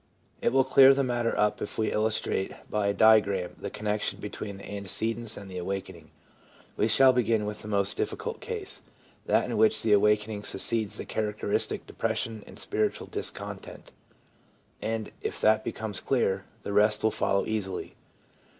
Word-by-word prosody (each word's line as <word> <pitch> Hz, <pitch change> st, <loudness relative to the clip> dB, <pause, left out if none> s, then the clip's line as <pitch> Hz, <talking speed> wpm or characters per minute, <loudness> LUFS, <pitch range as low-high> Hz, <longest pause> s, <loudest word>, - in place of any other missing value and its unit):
It -, -, +2 dB
will 135 Hz, 0 st, +4 dB
clear 135 Hz, +1 st, +7 dB
the 140 Hz, -, +1 dB
matter 120 Hz, -2 st, 0 dB
up 105 Hz, 0 st, +2 dB
if -, -, -5 dB
we 110 Hz, -, 0 dB
illustrate 110 Hz, -3 st, 0 dB, 0.2 s
by 105 Hz, -1 st, +1 dB
a -, -, +3 dB
diagram 100 Hz, -5 st, +4 dB
the 100 Hz, -, -4 dB
connection 105 Hz, +1 st, -2 dB
between 100 Hz, -2 st, -6 dB
the 100 Hz, -, -10 dB
antecedents 110 Hz, +3 st, -2 dB
and 100 Hz, -, -9 dB
the 90 Hz, -1 st, -6 dB
awakening. 95 Hz, +2 st, -5 dB, 0.7 s
We 110 Hz, -, +2 dB
shall 130 Hz, +3 st, +6 dB
begin 115 Hz, -3 st, +1 dB
with 105 Hz, 0 st, -5 dB
the -, -, -9 dB
most 100 Hz, -1 st, 0 dB
difficult 465 Hz, -1 st, -3 dB
case, 440 Hz, -4 st, -5 dB, 0.5 s
that -, -, +3 dB
in -, -, -2 dB
which 220 Hz, -, +3 dB
the 110 Hz, -2 st, +4 dB
awakening 105 Hz, 0 st, +2 dB
succeeds 110 Hz, +1 st, -1 dB
the -, -, -5 dB
charac 105 Hz, -1 st, -2 dB
teristic -, -, 0 dB
depression 110 Hz, -2 st, -3 dB
and -, -, -12 dB
spiritual -, -, -1 dB
discontent, -, -, -6 dB, 0.9 s
and 110 Hz, -1 st, -3 dB
if -, -, -4 dB
that 110 Hz, 0 st, +4 dB
becomes 105 Hz, -5 st, -4 dB
clear, 100 Hz, -7 st, 0 dB, 0.2 s
the 100 Hz, -, -4 dB
rest 105 Hz, +1 st, +4 dB
will 110 Hz, -, +3 dB
follow 100 Hz, -1 st, +1 dB
easily. 105 Hz, -4 st, -3 dB
105 Hz, 165 wpm, -28 LUFS, 100-115 Hz, 0.9 s, clear